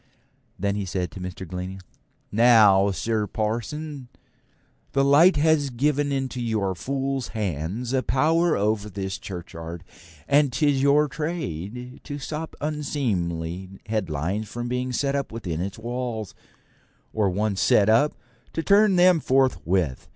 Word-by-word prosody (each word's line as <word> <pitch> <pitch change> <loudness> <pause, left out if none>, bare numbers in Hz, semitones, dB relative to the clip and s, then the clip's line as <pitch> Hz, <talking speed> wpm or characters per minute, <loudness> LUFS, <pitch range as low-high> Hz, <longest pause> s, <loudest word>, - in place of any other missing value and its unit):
Then 100 +1 0
he 100 -1 -3
said 90 -2 -3
to 95 - -9
Mr. 90 0 -6
Glennie: 90 +2 -5 0.5
'Now, 105 -4 +6
Sir 105 +2 -1
Parson, 120 +7 -3 0.9
the 135 0 +3
law 145 +6 +7
has 150 -1 +3
given 145 +3 0
into 135 -2 -2
your 110 -5 0
fool's 135 +4 -2
hands 100 - -3
a 130 - +2
power 160 +6 +2
over 105 0 0
this 95 -1 -4
churchyard, 85 -2 -7 0.4
and 145 -1 +4
'tis 135 +2 +2
your 145 +2 +4
trade 125 - -5
to 145 -1 -6
stop 155 +3 -5
unseemly 95 - -2
headlines 100 -1 -2
from 120 +1 -4
being 125 +1 -2
set 140 +2 0
up 140 -1 -2
within 90 -8 -4
its 95 +1 -4
walls, 120 -2 -4 0.8
or 105 -3 +2
once 100 +1 -1
set 100 - +4
up, 115 +7 +4 0.4
to 165 - -2
turn 200 +1 +5
them 180 0 +6
out 155 - -6
forthwith. 95 - +1
115 Hz, 135 wpm, -24 LUFS, 95-140 Hz, 0.9 s, law